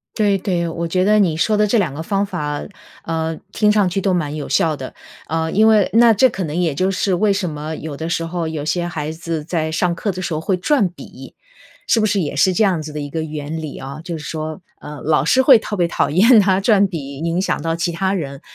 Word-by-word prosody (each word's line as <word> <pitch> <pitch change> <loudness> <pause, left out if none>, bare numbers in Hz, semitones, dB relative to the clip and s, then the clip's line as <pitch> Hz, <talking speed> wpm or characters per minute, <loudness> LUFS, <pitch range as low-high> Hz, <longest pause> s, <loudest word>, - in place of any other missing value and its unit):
对 205 -3 +2
对， 175 -3 -1
我 170 +1 -3
觉 185 +2 +1
得 215 +1 +4
你 170 -6 +2
说 215 +5 +2
的 210 - +3
这 210 +3 +2
2 175 -10 0
个 160 - -5
方 200 +3 0
法， 150 -7 -4 0.4
呃， 160 -1 -2 0.2
听 210 -1 +3
上 210 -3 +3
去 195 +2 -1
都 190 -1 +1
蛮 155 -4 -1
有 150 - -5
效 160 -2 +2
的， 130 -2 -8 0.3
呃， 160 +1 -1
因 220 +2 +4
为 215 -3 +4
那 230 0 +6
这 255 +5 +4
可 190 - -4
能 150 - -4
也 165 -5 0
就 185 +5 +1
是 190 0 0
为 200 +3 +2
什 195 -3 -1
么， 155 +1 -5
有 155 -2 -6
的 160 +3 -5
时 165 -1 -1
候 170 0 -3
有 155 -2 -4
些 175 +2 -1
孩 155 -3 -4
子 165 -1 -4
在 160 -2 -2
上 170 +2 0
课 200 +4 -2
的 185 - -6
时 180 - -3
候 155 - -2
会 185 +2 0
转 205 0 +1
笔， 175 - -12 0.5
是 225 - +3
不 215 - +2
是 205 -1 +1
也 145 -5 -2
是 185 +7 +3
这 180 - 0
样 180 -5 +1
子 155 - -7
的 150 - -5
一 145 - -5
个 160 +2 -3
原 155 +1 -5
理 155 -3 -7
啊？ 135 +3 -8
就 170 -1 -5
是 150 - -9
说， 155 +3 -5 0.2
呃， 150 -1 -9
老 150 -3 +2
师 255 - +3
会 260 -1 +7
特 215 -1 -5
别 175 -2 +2
讨 - - 0
厌 220 - +6
他 190 -1 +2
转 200 -1 +4
笔 140 -6 -6
影 170 +3 -1
响 - - -1
到 165 0 -1
其 170 +1 -1
他 190 +3 0
人， 140 -7 -4
170 Hz, 275 characters per minute, -19 LUFS, 155-195 Hz, 0.5 s, 会